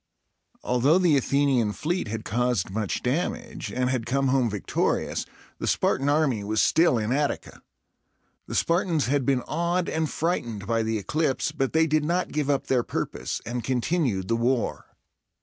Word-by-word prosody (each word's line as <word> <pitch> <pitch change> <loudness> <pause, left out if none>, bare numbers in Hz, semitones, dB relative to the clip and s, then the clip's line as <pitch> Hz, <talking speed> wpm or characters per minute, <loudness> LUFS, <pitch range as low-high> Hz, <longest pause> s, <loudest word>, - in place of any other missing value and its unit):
Although 130 +7 +3
the 175 -5 +4
Athenian 135 -5 +2
fleet 175 - -2
had 110 +1 -5
caused 120 -5 0
much 105 -1 -2
damage, 205 - -2
and 125 0 0
had 120 -3 -2
come 135 +2 +1
home 130 -3 +2
victorious, 105 -2 -1 0.3
the - - -3
Spartan 135 +2 +1
army 145 -8 +2
was 110 +1 -1
still 165 -1 +4
in 110 +1 -1
Attica. 145 +2 -2 0.9
The - - -5
Spartans 170 -3 +1
had 135 0 0
been 130 -3 +2
awed 170 +2 0
and 160 -1 -1
frightened 120 - -2
by 115 +1 +1
the 110 0 -1
eclipse, 140 - -1
but 135 -1 -2
they 160 0 +4
did 155 -1 +1
not 175 +4 0
give 150 -2 -1
up 140 -1 +1
their 130 -2 +2
purpose, - - -4
and 120 +1 -3
continued 125 - 0
the 115 - +1
war. 120 +1 0
130 Hz, 165 wpm, -26 LUFS, 115-155 Hz, 0.9 s, the